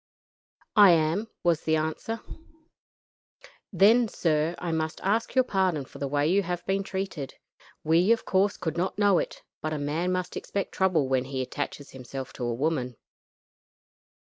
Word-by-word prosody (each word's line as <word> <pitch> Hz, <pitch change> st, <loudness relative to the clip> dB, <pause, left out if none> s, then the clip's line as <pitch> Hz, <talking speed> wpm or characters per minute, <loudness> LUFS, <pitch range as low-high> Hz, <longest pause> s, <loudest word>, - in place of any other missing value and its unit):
"I 205 Hz, -5 st, +8 dB
am," 165 Hz, +7 st, +1 dB, 0.2 s
was 170 Hz, -2 st, +2 dB
the 160 Hz, -, +1 dB
answer. 160 Hz, +9 st, -3 dB, 1.5 s
"Then, 225 Hz, +4 st, +5 dB
sir, 160 Hz, -3 st, 0 dB
I 175 Hz, -, -3 dB
must 160 Hz, -1 st, -2 dB
ask 220 Hz, +6 st, 0 dB
your 260 Hz, -, +5 dB
pardon 185 Hz, -, 0 dB
for 140 Hz, -, -13 dB
the 140 Hz, -, -2 dB
way 145 Hz, +1 st, +1 dB
you 190 Hz, +4 st, +3 dB
have 175 Hz, -2 st, -4 dB
been 195 Hz, +1 st, 0 dB
treated. 190 Hz, -8 st, -5 dB, 0.5 s
We, 170 Hz, +6 st, +3 dB
of 230 Hz, -, +2 dB
course, 195 Hz, +2 st, +2 dB
could 165 Hz, -2 st, -3 dB
not 185 Hz, +2 st, -1 dB
know 205 Hz, -3 st, +4 dB
it, -, -, -5 dB, 0.2 s
but 155 Hz, 0 st, -2 dB
a -, -, -2 dB
man 155 Hz, +5 st, -1 dB
must 185 Hz, -1 st, -2 dB
expect 200 Hz, -, -3 dB
trouble 180 Hz, -7 st, +2 dB
when 130 Hz, -1 st, +1 dB
he 130 Hz, -1 st, -3 dB
attaches 145 Hz, +1 st, -5 dB
himself 130 Hz, 0 st, -7 dB
to 125 Hz, -, -6 dB
a 120 Hz, -, 0 dB
woman." 130 Hz, -3 st, -1 dB
165 Hz, 165 wpm, -27 LUFS, 145-195 Hz, 1.5 s, I